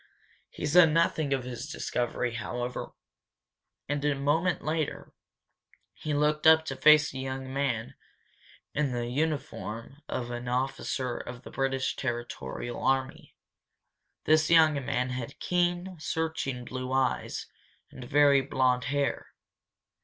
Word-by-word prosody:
He -, -, -6 dB
said 165 Hz, +1 st, +6 dB
nothing 160 Hz, -2 st, +2 dB
of 135 Hz, -2 st, +1 dB
his 125 Hz, +1 st, -6 dB
discovery, 120 Hz, -4 st, -2 dB
however, 120 Hz, +2 st, -4 dB, 0.9 s
and 145 Hz, 0 st, -2 dB
a 145 Hz, -1 st, +2 dB
moment 155 Hz, +6 st, +1 dB
later 155 Hz, -1 st, -2 dB, 0.8 s
he 155 Hz, -, -5 dB
looked 150 Hz, +2 st, +2 dB
up 160 Hz, 0 st, +7 dB
to -, -, -4 dB
face 155 Hz, -1 st, +6 dB
a 130 Hz, -, -5 dB
young 130 Hz, 0 st, -5 dB
man 130 Hz, -5 st, -1 dB, 0.8 s
in 145 Hz, -3 st, 0 dB
the 120 Hz, -1 st, -2 dB
uniform 135 Hz, -2 st, -3 dB
of 120 Hz, -1 st, -3 dB
an 120 Hz, 0 st, -5 dB
officer 130 Hz, 0 st, -1 dB
of 125 Hz, 0 st, -8 dB
the -, -, -10 dB
British 135 Hz, -1 st, -1 dB
territorial 120 Hz, -, -4 dB
army. 135 Hz, -1 st, -1 dB, 0.9 s
This 155 Hz, 0 st, +4 dB
young 155 Hz, -4 st, +5 dB
man 125 Hz, -1 st, -1 dB
had 125 Hz, -2 st, -5 dB
keen, 175 Hz, 0 st, 0 dB
searching 155 Hz, -6 st, -2 dB
blue 130 Hz, +1 st, -5 dB
eyes, 135 Hz, 0 st, 0 dB, 0.5 s
and 130 Hz, -, -9 dB
very 140 Hz, +1 st, +5 dB
blond 130 Hz, -2 st, +1 dB
hair. 140 Hz, 0 st, -2 dB
135 Hz, 125 wpm, -29 LUFS, 125-150 Hz, 0.9 s, up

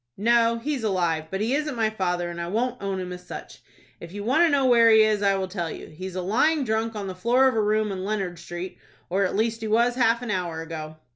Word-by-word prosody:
"No, 230 Hz, +2 st, +3 dB
he's 265 Hz, +1 st, -3 dB
alive, 175 Hz, -6 st, 0 dB
but 195 Hz, +3 st, -3 dB
he 225 Hz, +4 st, 0 dB
isn't 300 Hz, -1 st, -1 dB
my 220 Hz, -2 st, +1 dB
father, 180 Hz, -4 st, -2 dB
and 170 Hz, 0 st, -6 dB
I 170 Hz, -, -4 dB
won't 245 Hz, +6 st, -2 dB
own 195 Hz, -1 st, -2 dB
him 180 Hz, -1 st, -5 dB
as 180 Hz, 0 st, -10 dB
such. -, -, -9 dB, 0.4 s
If 170 Hz, +1 st, -10 dB
you 205 Hz, 0 st, -5 dB
want 260 Hz, +9 st, +2 dB
to 340 Hz, -, +4 dB
know 280 Hz, -2 st, +2 dB
where 235 Hz, -2 st, +6 dB
he 220 Hz, -1 st, +7 dB
is, 215 Hz, -1 st, +1 dB
I 200 Hz, -1 st, +3 dB
will 190 Hz, -1 st, -2 dB
tell 175 Hz, -3 st, -4 dB
you. -, -, -8 dB
He 180 Hz, +5 st, -7 dB
is 185 Hz, -, -8 dB
lying 240 Hz, -, +1 dB
drunk 225 Hz, -1 st, -1 dB
on 205 Hz, -2 st, -4 dB
the 190 Hz, -, -4 dB
floor 240 Hz, +8 st, +3 dB
of 260 Hz, -, +2 dB
a 220 Hz, -, +1 dB
room 215 Hz, 0 st, +1 dB
on 185 Hz, -1 st, -4 dB
Leonard 195 Hz, -4 st, -3 dB
Street, 175 Hz, +2 st, -7 dB, 0.3 s
or 195 Hz, +2 st, +2 dB
at 185 Hz, -, -2 dB
least 225 Hz, +2 st, 0 dB
he 220 Hz, -, -3 dB
was 235 Hz, +3 st, +3 dB
half 235 Hz, -1 st, +2 dB
an 235 Hz, -, -3 dB
hour 170 Hz, -4 st, -2 dB
ago." 155 Hz, -1 st, -7 dB
210 Hz, 265 wpm, -25 LUFS, 180-235 Hz, 0.4 s, he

